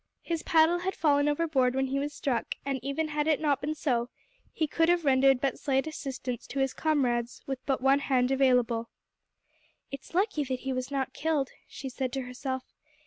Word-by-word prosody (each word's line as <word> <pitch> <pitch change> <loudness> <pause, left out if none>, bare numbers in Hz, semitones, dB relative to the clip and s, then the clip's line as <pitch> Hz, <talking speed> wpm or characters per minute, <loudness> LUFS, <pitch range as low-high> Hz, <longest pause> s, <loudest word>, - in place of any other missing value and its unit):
His 335 -2 -2
paddle 325 +2 +4
had 375 +2 -2
fallen 290 -2 +3
overboard 290 -5 +1
when 265 0 +1
he 270 +1 -1
was 290 +1 -2
struck, 265 -4 -2
and 275 -1 -1
even 290 +3 -2
had 300 0 -1
it 310 -2 +3
not 290 -3 +1
been 305 +2 -2
so, 245 -5 0 0.4
he 320 - 0
could 325 +2 +1
have 350 -2 +2
rendered 270 -1 +5
but 275 +1 -1
slight 270 -1 +1
assistance 265 -5 -5
to 275 - -7
his 270 -1 +1
comrades 245 -6 0
with 270 -2 -4
but 270 -2 +1
one 270 +1 +4
hand 255 -2 +1
available. 250 -4 +2 1.0
"It 275 -1 -5
is 330 - -15
lucky 380 -5 +1
that 255 -1 -3
he 270 0 -2
was 255 0 -3
not 270 -1 -2
killed," 300 -4 0 0.2
she 275 - -7
said 260 0 -3
to 270 - -1
herself. 260 +1 -4
275 Hz, 195 wpm, -29 LUFS, 260-300 Hz, 1.0 s, rendered